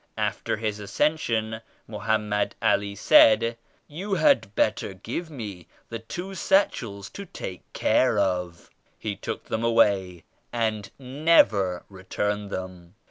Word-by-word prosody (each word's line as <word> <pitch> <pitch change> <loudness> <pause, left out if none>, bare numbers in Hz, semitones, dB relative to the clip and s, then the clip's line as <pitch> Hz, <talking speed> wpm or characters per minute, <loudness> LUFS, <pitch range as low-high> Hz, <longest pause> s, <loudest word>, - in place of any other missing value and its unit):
After - - -1
His 105 -1 -3
Ascension, 110 -1 -1 0.3
Mohammed 105 -1 -1
Ali 100 0 +1
said 115 +3 +5 0.3
Tou 190 +7 -3
had 275 - +3
bet 110 +1 +2
ter 95 - -6
give 125 - -5
me 105 - -8 0.2
the 115 - -5
two 175 +12 -7
satchels 115 - +1
to 200 - -7
take 95 - -8
care 125 -4 +2
of,' 90 -3 -1 0.3
He 105 -2 -4
took 100 - -5
them 110 +1 -3
away 100 -7 +2 0.3
and 110 -4 -1
never 125 - +2
returned 105 +2 -3
them. 95 -1 -7
110 Hz, 125 wpm, -25 LUFS, 100-120 Hz, 0.3 s, said